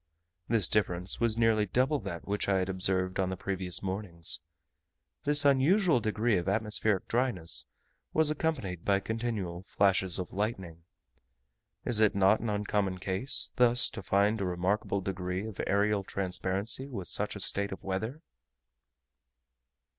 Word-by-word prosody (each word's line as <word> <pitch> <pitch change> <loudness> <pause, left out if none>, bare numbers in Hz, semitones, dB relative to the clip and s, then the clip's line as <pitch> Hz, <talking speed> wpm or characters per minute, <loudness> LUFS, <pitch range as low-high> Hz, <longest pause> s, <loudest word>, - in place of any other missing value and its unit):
This 110 -7 +4
difference 90 -3 -1
was 115 -2 +1
nearly 110 -2 +3
double 130 +9 +1
that 85 -8 -7
which 100 0 -1
I 95 - +3
had 95 0 -1
observed 95 0 0
on 95 -1 +1
the 95 - -4
previous 95 -2 -2
mornings. 95 -4 -1 0.9
This 145 0 +3
unusual 150 - +4
degree 110 0 +1
of 90 +2 -2
atmospheric 105 -1 +1
dryness 115 -9 0 0.4
was 155 -1 +3
accompanied 135 - -2
by 100 -1 +2
continual 105 -5 -3
flashes 95 -2 +1
of 90 -2 -5
lightning. 95 -6 -4 1.0
Is 120 -3 +3
it 110 -2 +3
not 100 +2 +4
an 115 - -3
uncommon 105 -2 -1
case, 95 +8 +1
thus 125 -1 +4
to - - -7
find 100 +4 +1
a - - 0
remarkable 95 +3 -1
degree 90 0 -3
of 110 -3 -5
aerial 100 0 +1
transparency 95 +6 -1
with 100 -9 -6
such 105 +1 -1
a - - -6
state 100 +1 -1
of 95 - -8
weather? 110 - -4
100 Hz, 145 wpm, -30 LUFS, 95-115 Hz, 1.0 s, This